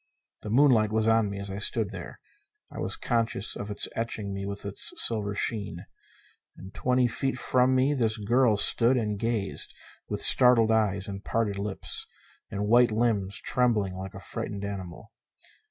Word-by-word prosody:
The 105 - -7
moonlight 115 -3 +4
was 110 0 0
on 115 -2 +3
me 100 - -6
as 100 0 -4
I 100 - -5
stood 110 -1 0
there. 90 -5 -9 0.5
I - - -8
was - - +1
conscious 115 -3 0
of 100 - -6
its 105 - -2
etching 110 -3 -4
me 100 0 -5
with 100 0 -6
its 100 0 -1
silver 105 -3 +3
sheen. 100 -6 -2 0.7
And 95 +2 -11
twenty 125 0 +1
feet 130 +2 -1
from 130 +1 +2
me 130 +3 +2
this 115 -5 0
girl 115 +1 +2
stood 120 +5 +4
and 105 -4 -2
gazed, 115 -3 -2 0.3
with - - -2
startled 120 -3 +5
eyes 105 -4 +1
and 100 0 -7
parted 105 -3 -1
lips 100 -1 -2 0.4
and 100 +1 -3
white 120 +2 +5
limbs 110 -4 0
trembling 110 -6 0
like 95 +2 -8
a - - -7
frightened 100 +2 -5
animal. 95 -4 -8
110 Hz, 170 wpm, -27 LUFS, 100-120 Hz, 0.7 s, startled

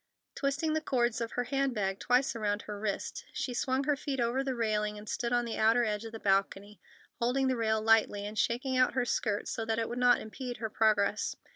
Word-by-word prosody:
Twisting 290 +3 -1
the 315 - 0
cords 240 -5 0
of 230 - -3
her 245 - 0
hand 270 +1 -1
bag 195 -2 -1
twice 250 +2 +2
about 210 -2 -1
her 210 -1 -7
wrist, 205 -1 -3
she 250 - -3
swung 260 +2 0
her 295 +1 +2
feet 275 -1 -4
over 240 +3 +1
the 265 -2 -2
railing 210 -2 0
and 210 +1 -10
stood 235 +2 -2
on 240 0 +2
the 230 - -4
outer 225 +2 +4
edge 210 0 -2
of 225 - -7
the 225 - -7
balcony, 195 0 0 0.4
holding 255 +3 +1
the 260 - +1
rail 220 -2 +1
lightly, 215 -2 +3
and 210 +1 -6
shaking 255 +3 0
out 255 0 +3
her 250 -2 +1
skirt 210 -3 -1
so 225 - -3
that 225 0 -1
it 225 -1 0
would 240 - -4
not 245 -1 +5
impede 245 +3 -6
her 220 -1 -4
progress. 210 -1 +2
230 Hz, 230 wpm, -31 LUFS, 215-255 Hz, 0.4 s, not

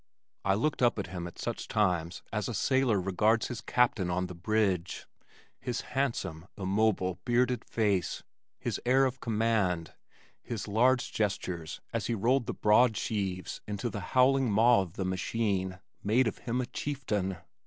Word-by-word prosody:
I 95 0 +3
looked 140 +8 0
up 120 -2 +4
at 100 - -2
him 85 -1 -4
at 85 - -11
such - - -4
times 90 -4 0
as 105 -1 -1
a 120 - -3
sailor 130 -2 +2
regards 105 +5 +2
his 120 -3 -5
captain 115 -7 +2
on 90 +1 0
the 90 - -7
bridge. 95 -1 0 0.5
His 120 -1 -3
handsome 115 - -2
immobile 95 -2 +1
bearded 125 0 +1
face, 100 -5 0 0.3
his - - -3
air 130 +2 +4
of 130 0 -2
command, 105 -8 0 0.5
his 115 -5 -5
large 125 +4 +3
gestures 90 -6 -2
as - - -1
he 120 - 0
rolled 120 +4 +2
the - - -1
broad 110 +1 +4
sheaves 95 -4 -3
into 105 +3 -3
the 100 - -4 0.2
howling 130 0 +5
maw 115 +2 +5
of 90 -4 -6
the 95 - -3
machine 95 0 -1 0.3
made 115 +6 +3
of 110 - -3
him 125 +1 -1
a - - -2
chieftain. 115 - -2
105 Hz, 160 wpm, -30 LUFS, 95-120 Hz, 0.5 s, howling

